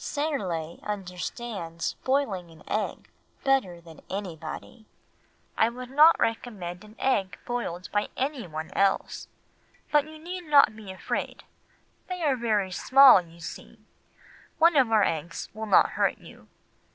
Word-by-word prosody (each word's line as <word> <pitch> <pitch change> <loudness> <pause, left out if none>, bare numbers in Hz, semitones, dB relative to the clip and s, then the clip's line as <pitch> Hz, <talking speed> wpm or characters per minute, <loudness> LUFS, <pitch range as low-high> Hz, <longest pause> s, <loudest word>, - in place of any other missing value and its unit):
Serle 190 - -3
understands 185 -2 -5
boiling 225 -10 0
an 160 -1 -16
egg 215 - -3 0.4
better 265 -11 +1
than 165 -2 -14
anybody. 190 +3 -7 0.7
I 225 - +3
would 250 +1 -9
not 305 +4 +6
recommend 210 -6 -3
an 215 +1 -15
egg 200 -8 0
boiled 185 -8 -4
by 205 0 0
anyone 185 - -4
else, 195 0 0 0.6
but 295 0 +3
you 310 0 -11
need 355 +3 -7
not 285 -7 +5
be 210 -3 -9
afraid, 190 - -4 0.7
they 360 -2 -4
are 285 -4 +3
very 215 -6 0
small 260 +2 +7
you 170 -1 -17
see—one 325 - -4
of 260 -5 +4
our 215 -2 +5
small 165 - +1
eggs 165 +3 -8
will 220 +1 -6
not 205 - +5
hurt - - +1
you. - - -15
215 Hz, 135 wpm, -27 LUFS, 180-270 Hz, 0.7 s, small